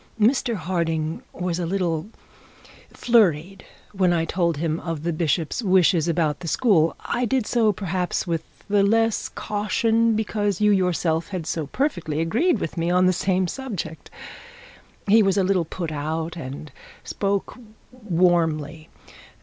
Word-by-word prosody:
Mr 235 Hz, +2 st, +2 dB
Harding 165 Hz, -3 st, -2 dB
was 180 Hz, -1 st, -3 dB
a 175 Hz, -, -1 dB
little 175 Hz, -2 st, -1 dB, 0.8 s
flurried 195 Hz, -6 st, +2 dB, 0.3 s
when 185 Hz, -3 st, +2 dB
I 165 Hz, -1 st, +1 dB
told 170 Hz, -2 st, 0 dB
him 160 Hz, +1 st, -1 dB
of 165 Hz, -3 st, -5 dB
the 170 Hz, 0 st, -1 dB
bishop's 160 Hz, -, -1 dB
wishes 185 Hz, -5 st, +3 dB
about 160 Hz, -3 st, 0 dB
the 170 Hz, -, -7 dB
school. 165 Hz, -5 st, +2 dB
I 245 Hz, +1 st, -1 dB
did 255 Hz, -1 st, 0 dB
so, 225 Hz, -2 st, +2 dB
perhaps, 180 Hz, -2 st, -2 dB
with 165 Hz, -3 st, -2 dB, 0.2 s
less 210 Hz, +2 st, +2 dB
caution 225 Hz, +2 st, 0 dB
because 205 Hz, -3 st, -1 dB
you 210 Hz, 0 st, +4 dB
yourself 175 Hz, -4 st, +1 dB
had 185 Hz, -5 st, -5 dB
so 160 Hz, -2 st, -3 dB
perfectly 175 Hz, -, -2 dB
agreed 235 Hz, -, +2 dB
with 170 Hz, -3 st, -5 dB
me 165 Hz, +1 st, 0 dB
on 180 Hz, +1 st, +3 dB
the 185 Hz, -, +4 dB
same 185 Hz, +1 st, +1 dB
subject. 195 Hz, -9 st, -6 dB, 1.0 s
He 220 Hz, +3 st, +5 dB
was 195 Hz, -1 st, +2 dB
a 195 Hz, -, +3 dB
little 185 Hz, -2 st, +1 dB
put 165 Hz, 0 st, -5 dB
out 160 Hz, +3 st, -3 dB
and 145 Hz, -2 st, -7 dB, 0.3 s
spoke 200 Hz, -1 st, -2 dB, 0.4 s
warmly. 165 Hz, -, 0 dB
180 Hz, 140 wpm, -23 LUFS, 165-205 Hz, 1.0 s, He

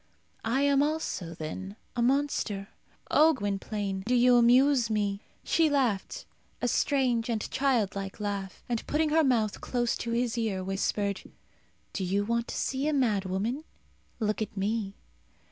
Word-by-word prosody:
I 235 Hz, +5 st, +1 dB
am 280 Hz, -1 st, +4 dB
also, 290 Hz, -, -2 dB
then, 190 Hz, +6 st, -6 dB, 0.2 s
a 240 Hz, -, 0 dB
monster. 240 Hz, -6 st, 0 dB, 0.4 s
O 320 Hz, +1 st, +6 dB
Gwynplaine, 200 Hz, -2 st, -3 dB
you 250 Hz, +1 st, +3 dB
do 245 Hz, +1 st, +6 dB
amuse 245 Hz, +1 st, +5 dB
me!" 205 Hz, -2 st, -1 dB, 0.2 s
She 325 Hz, -2 st, +3 dB
laughed, 250 Hz, -9 st, 0 dB, 0.3 s
a -, -, 0 dB
strange 250 Hz, -5 st, +1 dB
and 220 Hz, -2 st, -1 dB
childlike 210 Hz, -8 st, 0 dB
laugh; 200 Hz, -2 st, -4 dB
and, 235 Hz, -2 st, -2 dB
putting 310 Hz, +1 st, +1 dB
her 320 Hz, +1 st, +4 dB
mouth 230 Hz, -6 st, +1 dB
close 240 Hz, -1 st, 0 dB
to 235 Hz, -, -4 dB
his 235 Hz, 0 st, 0 dB
ear, 200 Hz, -5 st, -1 dB
whispered, 195 Hz, +1 st, -1 dB, 0.7 s
"Do 195 Hz, -, -2 dB
you 195 Hz, +3 st, 0 dB
want 235 Hz, +1 st, 0 dB
to -, -, -5 dB
see 270 Hz, +2 st, -1 dB
a 310 Hz, -, +1 dB
mad 220 Hz, -8 st, +1 dB
woman? 215 Hz, +10 st, -2 dB, 0.6 s
look 215 Hz, -1 st, -1 dB
at 210 Hz, -, -4 dB
me." 200 Hz, 0 st, -1 dB
230 Hz, 150 wpm, -29 LUFS, 200-260 Hz, 0.7 s, O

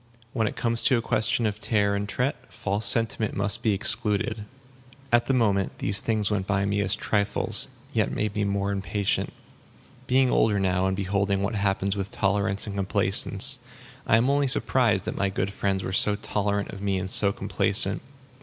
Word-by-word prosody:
When 110 Hz, -3 st, 0 dB
it -, -, -5 dB
comes 115 Hz, -1 st, +1 dB
to 130 Hz, -, +4 dB
a -, -, -1 dB
question 115 Hz, +1 st, 0 dB
of 105 Hz, -1 st, -2 dB
tare 105 Hz, -2 st, 0 dB
and 100 Hz, 0 st, -4 dB
tret, 125 Hz, +1 st, -3 dB
false 100 Hz, +1 st, -2 dB
sentiment 115 Hz, -2 st, +1 dB
must 100 Hz, +1 st, -1 dB
be 110 Hz, -, +1 dB
excluded. 105 Hz, +2 st, +1 dB, 0.7 s
At 120 Hz, 0 st, +3 dB
the 135 Hz, -, +1 dB
moment, 100 Hz, -5 st, 0 dB
these 100 Hz, -1 st, +1 dB
things 110 Hz, -2 st, -1 dB
went 100 Hz, -2 st, -2 dB
by 100 Hz, -1 st, 0 dB
me 100 Hz, 0 st, -1 dB
as 100 Hz, 0 st, 0 dB
trifles, 100 Hz, 0 st, +1 dB, 0.3 s
yet -, -, +1 dB
made 105 Hz, -1 st, -2 dB
me 105 Hz, -, -1 dB
more 100 Hz, 0 st, -1 dB
impatient. 100 Hz, 0 st, -2 dB, 0.8 s
Being 130 Hz, 0 st, +2 dB
older 105 Hz, -2 st, +2 dB
now, 95 Hz, -1 st, 0 dB
and 95 Hz, -, -1 dB
beholding 100 Hz, 0 st, -1 dB
what 100 Hz, +4 st, -2 dB
happens 100 Hz, -1 st, -1 dB
with 100 Hz, -1 st, -4 dB
tolerance 100 Hz, 0 st, 0 dB
and 100 Hz, -2 st, -6 dB
complacence, 100 Hz, +5 st, +3 dB, 0.5 s
I 110 Hz, -, +4 dB
am 115 Hz, +3 st, +1 dB
only 140 Hz, 0 st, +1 dB
surprised 125 Hz, -, +1 dB
that -, -, -5 dB
my 100 Hz, -, 0 dB
good 95 Hz, +1 st, -3 dB
friends 95 Hz, -1 st, -2 dB
were 95 Hz, -, -5 dB
so 105 Hz, +2 st, +3 dB
tolerant 100 Hz, 0 st, -2 dB
of 100 Hz, -, -10 dB
me 100 Hz, -1 st, -1 dB
and 95 Hz, 0 st, -4 dB
so 100 Hz, +1 st, +4 dB
complacent. -, -, 0 dB
100 Hz, 185 wpm, -25 LUFS, 100-110 Hz, 0.8 s, to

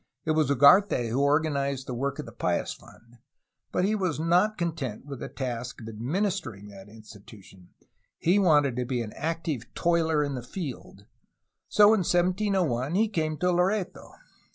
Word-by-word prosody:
It 160 Hz, -, +1 dB
was 155 Hz, -2 st, +2 dB
Ugarte 140 Hz, -, +5 dB
who 130 Hz, +4 st, 0 dB
organized 140 Hz, -2 st, 0 dB
the 125 Hz, -, -5 dB
work 140 Hz, +3 st, -2 dB
of 150 Hz, -, -6 dB
the 115 Hz, -, -10 dB
Pious 90 Hz, -6 st, -1 dB
Fund, 115 Hz, +1 st, -19 dB, 0.5 s
but 180 Hz, -, +1 dB
he 210 Hz, -, +1 dB
was 185 Hz, -8 st, -1 dB
not 180 Hz, +6 st, +2 dB
content 155 Hz, -10 st, -4 dB
with 140 Hz, -3 st, -8 dB
the -, -, -6 dB
task 125 Hz, -2 st, -5 dB
of 110 Hz, -, -10 dB
ad 110 Hz, -1 st, -8 dB
ministering 140 Hz, -, -2 dB
that 100 Hz, 0 st, -13 dB
institution; 105 Hz, -4 st, -15 dB, 0.4 s
he 180 Hz, +5 st, +2 dB
wanted 145 Hz, -9 st, +3 dB
to 125 Hz, -, -1 dB
be 120 Hz, -1 st, -2 dB
an 105 Hz, -, -9 dB
active 160 Hz, -6 st, -4 dB
toiler 160 Hz, -3 st, +1 dB
in 145 Hz, -1 st, -3 dB
the 125 Hz, -, -4 dB
field. 125 Hz, -, -8 dB, 0.6 s
So 210 Hz, +1 st, +6 dB
in 220 Hz, -, +2 dB
1701 175 Hz, -, 0 dB
he 215 Hz, +2 st, +2 dB
came 155 Hz, -6 st, -2 dB
to 180 Hz, +2 st, +1 dB
Loreto. 185 Hz, +2 st, -1 dB
145 Hz, 170 wpm, -27 LUFS, 120-175 Hz, 0.6 s, So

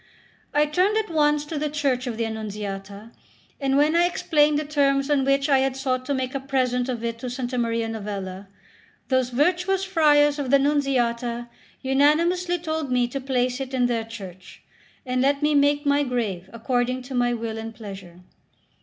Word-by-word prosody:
I 295 Hz, +1 st, +3 dB
turned 365 Hz, +8 st, +1 dB
at 435 Hz, -5 st, -1 dB
once 295 Hz, -1 st, +2 dB
to 295 Hz, 0 st, -4 dB
the 300 Hz, 0 st, -1 dB
church 275 Hz, -4 st, -1 dB
of 230 Hz, -3 st, -4 dB
the 230 Hz, -, 0 dB
Annunziata, 210 Hz, -1 st, -6 dB, 0.5 s
and 275 Hz, -1 st, +1 dB
when 300 Hz, +3 st, +3 dB
I 345 Hz, +1 st, +4 dB
explained 300 Hz, -4 st, +2 dB
the 300 Hz, -, -2 dB
terms 280 Hz, -1 st, +1 dB
on 280 Hz, -2 st, +3 dB
which 275 Hz, +1 st, +2 dB
I 275 Hz, -2 st, +4 dB
had 265 Hz, 0 st, 0 dB
sought 255 Hz, -1 st, -2 dB
to 280 Hz, -, 0 dB
make 255 Hz, -1 st, -3 dB
a 275 Hz, -, -2 dB
present 255 Hz, -2 st, 0 dB
of 240 Hz, -2 st, -3 dB
it 230 Hz, 0 st, -3 dB
to 250 Hz, -, -5 dB
S. 250 Hz, 0 st, -4 dB
Maria 230 Hz, -2 st, 0 dB
Novella, 200 Hz, -3 st, -5 dB, 0.6 s
those 260 Hz, -2 st, +2 dB
virtuous 360 Hz, +8 st, +1 dB
friars 295 Hz, -5 st, +3 dB
of 275 Hz, -3 st, -2 dB
the 280 Hz, -, +6 dB
Nunziata 245 Hz, -4 st, 0 dB, 0.3 s
unanimously 335 Hz, +7 st, +2 dB
told 315 Hz, -4 st, -3 dB
me 250 Hz, -1 st, +2 dB
to 275 Hz, +2 st, -4 dB
place 255 Hz, -1 st, 0 dB
it 265 Hz, 0 st, -4 dB
in 250 Hz, -1 st, +2 dB
their 235 Hz, -2 st, 0 dB
church, 190 Hz, -5 st, -11 dB, 0.4 s
and 255 Hz, 0 st, 0 dB
let 280 Hz, +2 st, +1 dB
me 300 Hz, 0 st, +3 dB
make 290 Hz, +1 st, +3 dB
my 285 Hz, 0 st, +3 dB
grave 220 Hz, -9 st, -2 dB
according 245 Hz, +2 st, -1 dB
to 260 Hz, +2 st, -9 dB
my 245 Hz, -1 st, +1 dB
will 225 Hz, -1 st, -4 dB
and 225 Hz, 0 st, -7 dB
pleasure. 195 Hz, -5 st, -10 dB
260 Hz, 185 wpm, -24 LUFS, 235-290 Hz, 0.6 s, the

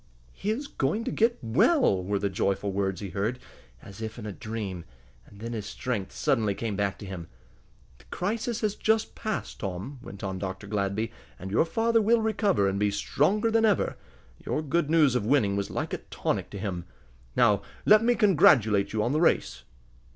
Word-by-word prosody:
"He 200 Hz, -, -4 dB
is 245 Hz, +7 st, -1 dB
going 205 Hz, -, -1 dB
to -, -, -3 dB
get 230 Hz, +2 st, +2 dB
well!" 115 Hz, -, +3 dB
were 100 Hz, +2 st, -1 dB
the 100 Hz, -, 0 dB
joyful 100 Hz, +1 st, -1 dB
words 95 Hz, -1 st, -1 dB
he 100 Hz, -, -5 dB
heard, 105 Hz, +7 st, -1 dB, 0.5 s
as 100 Hz, +2 st, -11 dB
if 110 Hz, +1 st, -5 dB
in 110 Hz, -, -7 dB
a 105 Hz, -, -4 dB
dream, 100 Hz, -4 st, -5 dB, 0.4 s
and 100 Hz, -, -16 dB
then 115 Hz, +2 st, -5 dB
his 105 Hz, -3 st, -4 dB
strength 100 Hz, -1 st, -3 dB
suddenly 110 Hz, -6 st, +1 dB
came 110 Hz, -2 st, -3 dB
back 100 Hz, -1 st, -1 dB
to -, -, -9 dB
him. 90 Hz, -3 st, -7 dB, 0.7 s
"The -, -, -20 dB
crisis 225 Hz, +4 st, -2 dB
is 210 Hz, -2 st, +1 dB
just 220 Hz, +1 st, +1 dB
passed, 215 Hz, -2 st, -4 dB
Tom," 100 Hz, +8 st, -5 dB
went 100 Hz, -5 st, -10 dB
on 95 Hz, -1 st, -3 dB
Dr. 95 Hz, +1 st, -5 dB
Gladby, 100 Hz, +2 st, -1 dB, 0.3 s
"and 95 Hz, +2 st, -7 dB
your 115 Hz, -, +3 dB
father 225 Hz, +6 st, +2 dB
will 230 Hz, +2 st, +4 dB
recover, 205 Hz, -, +2 dB
and 100 Hz, 0 st, -1 dB
be 105 Hz, 0 st, +2 dB
stronger 170 Hz, -, +1 dB
than 225 Hz, 0 st, +3 dB
ever. 210 Hz, -4 st, +2 dB, 0.5 s
Your 155 Hz, -, -2 dB
good 155 Hz, +1 st, 0 dB
news 155 Hz, -5 st, +4 dB
of 125 Hz, -4 st, 0 dB
winning 110 Hz, -7 st, +3 dB
was 100 Hz, 0 st, -2 dB
like -, -, -3 dB
a -, -, -2 dB
tonic -, -, -3 dB
to 100 Hz, -, -7 dB
him. 95 Hz, -3 st, -4 dB, 0.5 s
Now 100 Hz, -1 st, +4 dB, 0.2 s
let 215 Hz, +1 st, +7 dB
me 240 Hz, +1 st, +3 dB
congratulate 130 Hz, -, +4 dB
you 110 Hz, -1 st, +1 dB
on 120 Hz, -, 0 dB
the 155 Hz, +2 st, +1 dB
race." 175 Hz, -, +2 dB
110 Hz, 195 wpm, -27 LUFS, -, 0.7 s, let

